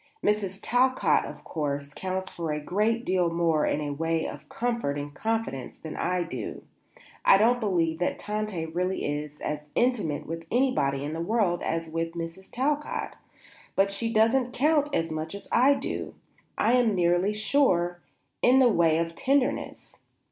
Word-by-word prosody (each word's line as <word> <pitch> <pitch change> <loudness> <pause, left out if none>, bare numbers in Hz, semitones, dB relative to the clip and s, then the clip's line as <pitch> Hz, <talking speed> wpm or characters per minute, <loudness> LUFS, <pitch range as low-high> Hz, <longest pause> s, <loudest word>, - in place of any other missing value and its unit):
Mrs. 200 -2 +1
Talcott, 255 +2 +3
of - - -9
course, 145 -2 -3
counts 190 +2 -4
for 165 -2 -3
a 150 - -1
great 215 +9 0
deal 180 -2 +2
more 165 -2 +1
in 150 0 0
the 145 - -2
way 165 +2 -1
of - - -8
comfort 235 -12 -1
and 145 0 -5
confidence 220 - -3
than 160 - -8
I 180 0 0
do; 170 - -6 0.6
I 195 - +7
don't 235 +4 +4
believe 170 -7 0
that 180 - 0
Tante 210 -5 -3
really 180 +3 -2
is 150 0 -4
as 150 0 -2 0.2
intimate 210 - +1
with 165 +1 -6
anybody 230 - +1
in 150 +2 -3
the 165 - -3
world 190 -2 +1
as 165 0 -2
with 165 +1 -3
Mrs. 170 +3 -7
Talcott; 290 +4 -1 0.6
but 195 +1 +3
she 230 +3 -2
doesn't 240 +3 +3
count 295 +2 +2
as 165 - 0
much 155 +3 -4
as 200 - -9
I 270 +4 +5
do, 275 - -4 0.4
I 235 - +3
am 230 -4 +3
nearly 175 +3 +2
sure, 180 -7 +2 0.4
in 250 +2 +5
the 260 -2 +6
way 165 -6 +3
of 165 0 -1
tenderness. 275 +7 -1
180 Hz, 165 wpm, -27 LUFS, 165-230 Hz, 0.6 s, I